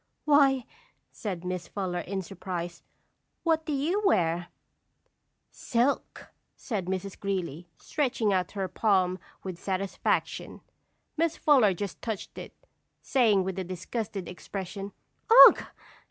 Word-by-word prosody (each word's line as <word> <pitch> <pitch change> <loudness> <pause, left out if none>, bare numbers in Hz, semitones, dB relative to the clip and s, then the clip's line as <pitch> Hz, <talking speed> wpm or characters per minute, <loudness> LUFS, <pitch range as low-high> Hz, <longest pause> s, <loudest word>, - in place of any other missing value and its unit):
"Why," 275 -4 +4 0.5
said 185 -5 -5
Miss 180 -1 -3
Fuller, 185 -3 -3
in 190 +2 -4
surprise, 175 -2 -6 0.6
"what 320 -2 +1
do - - -1
you 310 +9 0
wear?" 175 - +2 1.0
"Silk," 245 +4 -1 0.2
said 205 -7 -4
Mrs. 190 +1 -4
Greeley, 180 -4 -3
stretching 245 -8 0
out 180 -2 -1
her 195 -2 -2
palm 185 -3 +1 0.2
with 185 -3 -6
satisfaction. 190 0 -2 0.6
Miss 330 0 +1
Fuller 250 - +4
just 200 +1 -5
touched 220 -4 -5
it, - - -10 0.5
saying, 220 -8 +3
with 190 0 -3
a - - -2
disgusted 190 +2 -5
expression, 195 +2 -6 0.6
"Ugh! - - -4
195 Hz, 115 wpm, -28 LUFS, 180-240 Hz, 1.0 s, Why